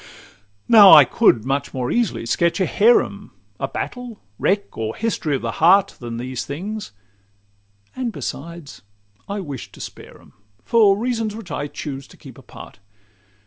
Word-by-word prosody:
Now 210 -4 +8
I 150 -3 +9
could 115 -2 +2
much 140 +1 -2
more 125 -1 -2
easily 235 - -1
sketch 170 +10 0
a 190 - +2
harem, 230 +7 +2 0.3
A - - -2
battle, 245 -3 -6 0.2
wreck, 200 +1 -1
or 110 0 -4
history 195 -10 -2
of 130 - -5
the 115 - -2
heart, 185 +4 +4
Than 120 -1 -6
these 125 +1 -5
things; 200 - -6 1.0
and 255 -2 -3
besides, 170 -4 -8 0.5
I 200 0 -3
wish 140 -8 -8
to - - -15
spare - - -10
'em, - - -21 0.3
For 205 - +4
reasons 225 -2 -2
which 225 -4 -10
I 145 - -3
choose 140 -2 -7
to - - -18
keep - - -14
apart. - - -13
170 Hz, 155 wpm, -20 LUFS, 135-215 Hz, 1.0 s, I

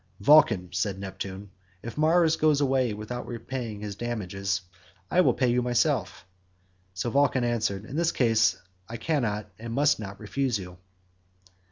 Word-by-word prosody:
"Vulcan," 115 - +5
said 100 -3 -1
Neptune, 95 0 -7 0.3
"if 115 - -7
Mars 160 +1 +3
goes 155 -2 +3
away 130 -4 +2
without 110 +4 -6 0.2
paying 115 -6 -5
his 105 -1 -5
damages, 100 -4 -3 0.5
I 180 - +5
will - - +3
pay 130 -2 +2
you 125 +1 +2
myself." 120 - 0 0.7
So 105 +6 -2
Vulcan 135 -2 +2
answered, 110 -4 -1
"In 130 - -8
this 170 0 +2
case 115 -3 +3 0.3
I 115 - -5
cannot 110 -7 -1
and 115 0 -6
must 145 +1 +3
not 100 -2 -7
refuse 125 +2 -1
you." 90 -2 -10
115 Hz, 150 wpm, -27 LUFS, 100-135 Hz, 0.7 s, Vulcan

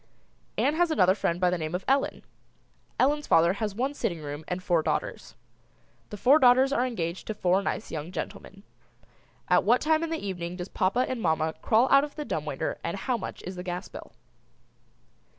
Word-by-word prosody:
Ann 290 - +2
has 350 0 +3
another 185 - +4
friend 175 -3 -1
by 180 -1 +3
the 180 - -1
name 155 +2 -3
of 185 - -4
Ellen. 270 +1 +1 0.8
Ellen's 295 +2 +2
father 170 +2 +4
has 210 -2 -2
one 265 +5 -1
sitting 175 - -2
room 145 +1 -6
and 180 0 -4
four 170 -3 +2
daughters. - - -3 0.7
The 210 - -7
four 270 +9 +5
daughters 260 +1 +5
are 255 -2 +1
engaged 175 -7 -4
to 215 - -3
four 185 -1 +2
nice 205 - -3
young 155 +2 -5
gentlemen. 195 +1 -7 0.8
At - - +4
what - - +4
time 315 0 +2
in 330 - -2
the 325 - -1
evening 175 -2 -4
does 180 0 -6
papa 215 +7 +1
and 255 -3 -3
mamma 160 -2 +1
crawl 230 +4 +3
out 275 0 +7
of 295 - -6
the 300 - -5
dumb 155 - -3
waiter 145 -3 -3
and 170 - -3
how 250 +6 -1
much 220 - -6
is 185 +1 -6
the 180 - -6
gas 180 0 -5
bill? - - -10
195 Hz, 200 wpm, -27 LUFS, 175-260 Hz, 0.8 s, out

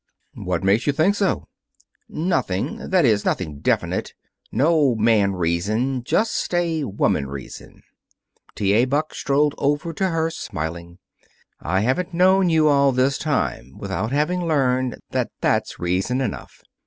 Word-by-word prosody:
"What 90 -1 -3
makes 100 +7 +2
you 145 - +3
think 160 +8 +3
so?" 200 -2 -1 0.6
"Nothing. 155 - -2
That 185 -4 +3
is, 105 -4 +3
nothing 75 -6 -2
definite. - - -1 0.4
No 150 -4 +3
man 110 -3 +3
reason. 105 +9 -1
Just 220 - 0
a 165 -4 0
woman 95 - 0
reason." 70 -1 -10 0.7
T. 100 -1 +1
A. 115 +4 +4
Buck 145 +4 -1
strolled 145 +1 +1
over 145 +4 0
to 190 +4 0
her, 165 -1 0
smiling. 85 - -6 0.6
"I 95 +4 0
haven't 135 - -1
known 185 +1 +4
you 160 -2 +3
all 140 -1 +4
this 130 +2 +1
time 125 - -2
without 110 +7 -3
having 170 +5 0
learned 130 -5 +1
that - - -1
that's - - 0
reason 95 +9 -1
enough. 125 -6 -5
130 Hz, 140 wpm, -22 LUFS, 100-160 Hz, 0.7 s, A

